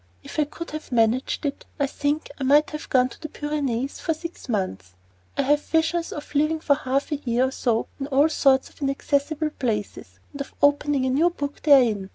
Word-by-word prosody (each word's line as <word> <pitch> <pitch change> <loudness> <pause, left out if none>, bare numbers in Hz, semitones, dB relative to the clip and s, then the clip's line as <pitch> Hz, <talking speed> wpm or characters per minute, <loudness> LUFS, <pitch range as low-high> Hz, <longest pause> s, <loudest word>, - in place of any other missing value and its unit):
If - - -6
I 300 - +4
could 335 +3 -8
have 310 -2 -7
managed 240 +5 +1
it, 280 - -3 0.2
I 280 - +3
think 290 +2 -2
I - - -2
might 290 +3 +4
have 300 0 -7
gone 255 -1 +3
to - - -14
the 310 - -5
Pyrenees 280 -4 -2
for 325 - -1
six 335 -3 -9
months. 95 - -3 0.4
I 280 - +2
have 295 +2 +3
visions 325 +2 0
of 295 0 -8
living 305 +2 +2
for 300 -2 +3
half 275 0 -1
a 295 - 0
year 255 -1 +1
or - - -10
so 235 -4 0
in 275 - -3
all 285 +2 +4
sorts 270 -3 +3
of - - -23
inaccessible 285 +2 0
places, 210 - -3
and 285 - -6
of 280 - -8
opening 285 -1 +3
a 260 - +1
new 315 +7 +4
book 290 -4 -5
therein. 235 -10 +4
280 Hz, 205 wpm, -24 LUFS, 255-300 Hz, 0.4 s, I